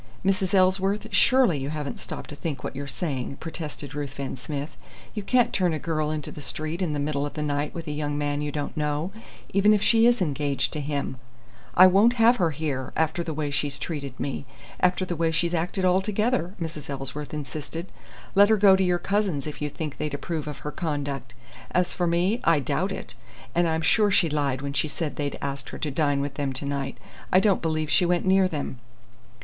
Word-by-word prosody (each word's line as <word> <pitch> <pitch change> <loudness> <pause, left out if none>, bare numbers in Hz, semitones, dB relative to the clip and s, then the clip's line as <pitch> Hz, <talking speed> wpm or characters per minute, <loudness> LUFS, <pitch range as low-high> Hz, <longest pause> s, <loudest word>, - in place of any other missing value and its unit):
"Mrs. 195 0 +2
Ellsworth, 190 +2 +2
surely 255 - +5
you 135 +1 -3
haven't 150 -2 -4
stopped - - -6
to - - -6
think 145 -3 -4
what - - -5
you're 140 +1 -4
saying!" 140 -3 -3
protested 155 -3 -6
Ruthven 140 -2 -4
Smith. 145 +3 -5 0.4
"You 210 - -3
can't 245 +4 +2
turn 180 -3 +2
a - - -1
girl 155 -1 -1
into 155 -1 -3
the 150 - -9
street 155 +4 -3
in 170 -5 0
the 145 - -1
middle 145 0 -1
of 145 - -4
the 150 - -2
night 145 0 -1
with 165 -1 -5
a 150 - -4
young 145 0 -2
man 145 0 -1
you 150 0 -2
don't 145 0 -4
know, 150 +3 -1 0.4
even 205 +2 +5
if 205 - 0
she 230 0 +5
is 240 0 +4
engaged 145 -6 0
to 155 - -2
him." 140 -2 -2 0.6
"I 185 - +9
won't 200 +6 +6
have 235 +1 +5
her 175 -4 +2
here, 145 -3 -3
after 160 +2 +1
the 165 - -4
way 150 -2 -2
she's 145 0 -1
treated 140 -6 -5
me 140 -1 -3 0.3
after 180 +1 +2
the 175 - -3
way 165 0 +1
she's 170 +1 +1
acted 175 +3 0
altogether," 195 +2 +1
Mrs. 160 -4 -5
Ellsworth 140 +1 -4
insisted. 155 +3 -6 0.4
"Let 200 +1 +6
her 220 - +5
go 200 -1 +7
to 190 - +2
your 180 -1 +2
cousins' 195 -7 0
if 150 -1 -6
you 150 - -1
think 150 0 -6
they'd 150 -2 -2
approve 155 +1 -4
of 150 -2 -5
her 150 - -2
conduct. 145 -6 -3 0.3
As 180 0 +1
for 175 -2 0
me, 180 +7 +1
I 165 -3 +4
doubt 135 - -1
it. - - -5 0.4
And 175 0 +3
I'm 160 0 0
sure 210 +5 +4
she 175 -5 +3
lied 140 -3 0
when 140 0 -3
she 150 - +1
said 155 0 -3
they'd 145 -1 -2
asked 140 0 -3
her - - -7
to 150 - -2
dine 145 0 +1
with 140 0 -3
them 135 -2 -1
to 130 +2 -4
night. 140 -1 -3 0.3
I 185 - +7
don't 200 -1 +3
believe 155 -2 -1
she 175 - +4
went 175 +1 +1
near 190 0 +5
them." 145 -6 -4
155 Hz, 215 wpm, -26 LUFS, 145-185 Hz, 0.6 s, I